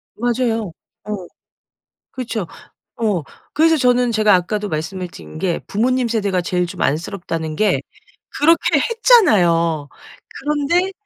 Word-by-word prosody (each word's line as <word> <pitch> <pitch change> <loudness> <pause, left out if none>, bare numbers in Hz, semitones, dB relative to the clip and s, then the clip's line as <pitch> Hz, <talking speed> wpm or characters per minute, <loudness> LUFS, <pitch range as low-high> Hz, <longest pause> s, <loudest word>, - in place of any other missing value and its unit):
맞아요. 230 -4 -1 0.3
어 205 -4 -5 0.8
그쵸. 225 -7 -4 0.5
어 210 -9 0 0.3
그래서 320 +2 +4
저는 250 -2 +2
제가 215 -2 +4
아까도 205 +3 0
말씀을 165 +4 -4
드린 80 - -12
게 180 -3 -1
부모님 250 +4 +1
세대가 205 -5 0
제일 180 0 -1
좀 - - -8
안쓰럽다는 160 0 -2
게 190 -10 +1 0.6
그렇게 330 +3 +3
했잖아요. 175 - +3 0.5
그런데 300 +6 0
210 Hz, 260 characters per minute, -19 LUFS, 175-250 Hz, 0.8 s, 그래서